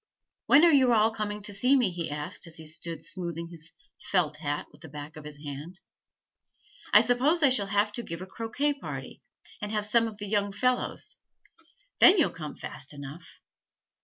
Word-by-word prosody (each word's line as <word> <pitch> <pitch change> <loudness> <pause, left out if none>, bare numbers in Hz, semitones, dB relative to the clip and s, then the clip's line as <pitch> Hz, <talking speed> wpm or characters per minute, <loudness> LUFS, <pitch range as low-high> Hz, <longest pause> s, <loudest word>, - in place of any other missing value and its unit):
'When 300 +5 +7
are 335 - +6
you 260 -4 +5
all 220 0 +4
coming 210 -1 -4
to 205 - -3
see 250 +8 +3
me?' 245 -8 +3
he 170 -2 -4
asked, 150 +3 -5
as 165 - -12
he 160 - -10
stood 160 +2 -5
smoothing 170 -2 -5
his 165 -1 -7 0.4
felt 160 -5 +2
hat 145 -1 -3
with - - -20
the 160 - -10
back 145 +1 -8
of 155 -1 -10
his 150 -1 -8
hand. 150 +5 -7 1.1
'I 210 - +9
suppose 260 +8 +2
I 275 - +6
shall 210 -6 +2
have 205 +1 +2
to 225 - -3
give 170 -7 -6
a - - -7
croquet 230 +9 -1
party, 280 - -8 0.4
and 210 0 -3
have 210 -1 -1
some 230 +2 +3
of 215 -2 -8
the 205 - -6
young 205 -1 0
fellows, 250 +4 -1 0.8
then 370 +3 +8
you'll 325 - +3
come 155 -4 -7
fast 145 +2 -8
enough. 145 +4 -10
200 Hz, 190 wpm, -28 LUFS, 160-230 Hz, 1.1 s, I